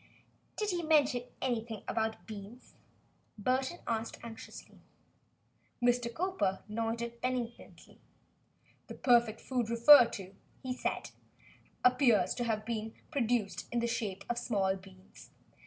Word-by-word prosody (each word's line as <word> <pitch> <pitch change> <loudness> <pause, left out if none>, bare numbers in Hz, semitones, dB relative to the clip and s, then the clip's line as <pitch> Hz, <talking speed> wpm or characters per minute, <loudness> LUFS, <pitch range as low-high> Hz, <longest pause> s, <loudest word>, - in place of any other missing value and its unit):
"Does 420 -1 0
he 350 -1 -1
mention 290 -6 +3 0.2
anything 230 -4 -2
about 220 -1 -2
beans?" 215 +3 -10 0.6
Burton 260 - 0
asked 225 -1 -2
anxiously. 230 -1 -10 1.0
Mr. 245 -1 +2
Cowper 310 - -1
nodded 230 +2 -3
benignantly. 245 -2 -5 0.9
"The - - -8
perfect 235 -3 +3
food 245 -4 -1
referred 235 +1 +8
to," 190 -1 -7 0.3
he 255 -1 -2
said, 250 - -3 0.7
"appears 250 -3 +4
to 240 - -2
have 215 -2 -1
been 220 -1 -4 0.2
produced 240 -7 0
in 240 - -1
the 235 - +1
shape 205 -4 -3
of 240 0 -1
small 195 -5 +1
beans. 190 0 -15
235 Hz, 120 wpm, -32 LUFS, 220-250 Hz, 1.0 s, referred